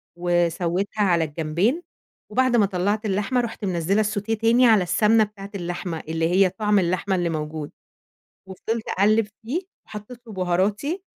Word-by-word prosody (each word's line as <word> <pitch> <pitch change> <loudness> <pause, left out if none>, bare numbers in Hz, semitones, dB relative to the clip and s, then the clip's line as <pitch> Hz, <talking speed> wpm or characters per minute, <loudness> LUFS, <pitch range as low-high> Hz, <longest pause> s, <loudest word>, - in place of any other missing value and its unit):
وسوّيتها 175 +3 0
على 175 -4 +3
الجنبين، 165 - -1 0.5
وبعد 255 +2 +2
ما 215 -3 +5
طلّعت 200 +3 -1
اللحمة، 210 +5 0
رُحت 230 -2 -5
منزّلة 185 +3 +1
الsautée 215 +1 -2
تاني 230 +3 +4
على 215 -5 +5
السَمنة 215 +5 +3
بتاعة 200 -1 -8
اللحمة، 175 -2 -4
اللي 165 +1 0
هي 185 +1 +4
طَعم 210 +1 +1
اللحمة 185 +2 0
اللي 175 -2 0
موجود، 155 -1 -4 0.8
وفضلت 220 +4 -4
أقلّب 215 +2 +3 0.2
فيه، 290 +10 -1 0.3
وحطيت 215 +3 -9
له 220 - -9
بهاراتي. 195 - -1
200 Hz, 145 wpm, -23 LUFS, 175-220 Hz, 0.8 s, ما